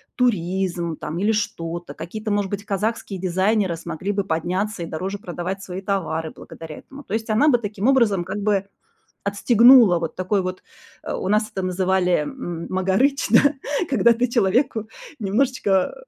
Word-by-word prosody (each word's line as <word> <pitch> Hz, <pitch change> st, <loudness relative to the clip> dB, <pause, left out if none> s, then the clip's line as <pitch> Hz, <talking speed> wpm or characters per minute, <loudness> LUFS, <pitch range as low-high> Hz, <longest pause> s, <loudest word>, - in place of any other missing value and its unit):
туризм 180 Hz, -, 0 dB
там 160 Hz, -, -5 dB
или 205 Hz, +4 st, +2 dB
что-то. 170 Hz, -5 st, -3 dB
Какие-то, 215 Hz, +6 st, -6 dB
может 205 Hz, -2 st, 0 dB
быть, 205 Hz, 0 st, -3 dB
казахские 205 Hz, -1 st, -2 dB
дизайнеры 190 Hz, +1 st, +1 dB
смогли 170 Hz, +4 st, -4 dB
бы 200 Hz, 0 st, -1 dB
подняться 185 Hz, +3 st, -2 dB
и -, -, -3 dB
дороже 185 Hz, +6 st, -4 dB
продавать 185 Hz, 0 st, -5 dB
свои 185 Hz, 0 st, -6 dB
товары 165 Hz, -5 st, -2 dB
благодаря 160 Hz, -2 st, -10 dB
этому. 280 Hz, +2 st, -12 dB
То 210 Hz, -, -3 dB
есть 225 Hz, 0 st, -4 dB
она 250 Hz, +8 st, +4 dB
бы 245 Hz, -, +5 dB
таким 210 Hz, -1 st, -3 dB
образом, 230 Hz, -9 st, +3 dB
как 190 Hz, +3 st, -5 dB
бы 200 Hz, -2 st, +1 dB, 0.6 s
отстегнула 225 Hz, -1 st, +6 dB
вот 165 Hz, -, -4 dB
такой 185 Hz, +2 st, 0 dB
вот, 185 Hz, 0 st, -5 dB, 0.4 s
э, -, -, -4 dB
у -, -, -3 dB
нас 215 Hz, +1 st, +2 dB
это 190 Hz, -, -3 dB
называли, 185 Hz, 0 st, +1 dB
м 170 Hz, -, -5 dB
магарыч, 195 Hz, +10 st, +1 dB
да, 280 Hz, +6 st, +5 dB, 0.3 s
когда 235 Hz, -3 st, +4 dB
ты 245 Hz, +2 st, 0 dB
человеку 230 Hz, 0 st, +1 dB, 0.3 s
немножечко 205 Hz, -3 st, +1 dB
195 Hz, 160 wpm, -22 LUFS, 180-220 Hz, 0.6 s, отстегнула